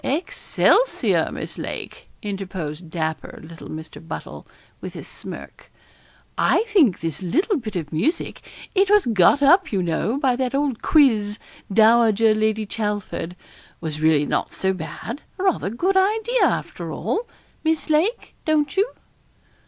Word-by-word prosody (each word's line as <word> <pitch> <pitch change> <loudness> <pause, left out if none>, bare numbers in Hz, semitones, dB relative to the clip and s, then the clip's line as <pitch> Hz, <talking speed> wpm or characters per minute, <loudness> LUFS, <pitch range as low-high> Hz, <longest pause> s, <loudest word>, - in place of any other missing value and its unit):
'Excelsior, 360 - +1
Miss - - -7
Lake,' - - -7
interposed 185 -5 -5
dapper 160 -1 -4
little 165 +1 -11
Mr. 155 0 -8
Buttle, - - -7 0.3
with - - -7
a - - -7
smirk; - - -10 0.7
'I - - +3
think 370 - +3
this 165 +1 -4
little 350 - +1
bit 215 -5 -7
of 160 -3 -4
music 265 - -1 0.3
it 390 -1 +3
was 415 0 +5
got 230 +5 +4
up, 360 +7 +5
you 195 -4 0
know, 175 +9 0
by 265 -4 +2
that 255 +1 -1
old 275 -4 0
quiz, 220 -9 +3 0.3
Dowager 225 0 +5
Lady 215 0 0
Chelford 205 -5 -3 0.4
was 155 -2 -5
really 155 -2 +4
not - - -1
so 190 0 0
bad 185 - -6 0.2
a 375 - -4
rather 370 - +1
good 355 - 0
idea, 440 +5 +3
after - - -2
all, 460 +3 -2 0.3
Miss 320 -1 0
Lake. 365 +11 +1
Don't 300 -2 +1
you?' 400 +5 +2
225 Hz, 140 wpm, -22 LUFS, -, 0.7 s, was